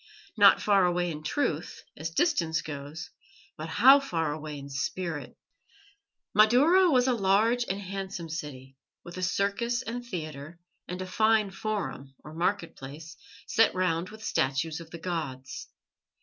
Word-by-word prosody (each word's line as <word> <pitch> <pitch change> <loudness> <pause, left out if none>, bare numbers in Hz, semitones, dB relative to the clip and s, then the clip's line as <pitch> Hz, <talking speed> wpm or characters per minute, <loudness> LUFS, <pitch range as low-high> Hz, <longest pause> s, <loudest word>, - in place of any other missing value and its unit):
Not - - +7
far 200 -2 +3
away 175 0 0
in 150 -1 -6
truth, 160 - -2
as 155 +2 -4
distance 165 - +1
goes, 145 +3 -7 0.4
but 155 +1 -6
how 265 - +7
far 165 - -2
away 155 -1 -6
in 140 0 -8
spirit! 145 +3 -4 1.0
Madaura 285 - +5
was 250 -5 +4
a 260 - +3
large 225 +3 +2
and 195 +1 -2
handsome 195 -2 -5
city, 135 -4 -7 0.3
with 175 +1 -10
a - - -4
circus 200 +7 0
and 245 +1 -5
theatre, 155 -6 -7 0.3
and 180 +1 -4
a - - -6
fine 215 +1 +2
forum, 195 -9 -4
or 155 - -10
market 175 +2 -1
place, 150 +4 -10 0.3
set 225 -3 +3
round 180 -1 0
with 220 0 -12
statues 145 +2 0
of 165 -1 -11
the 170 - -8
gods. 155 -7 -5
175 Hz, 150 wpm, -28 LUFS, 155-215 Hz, 1.0 s, Not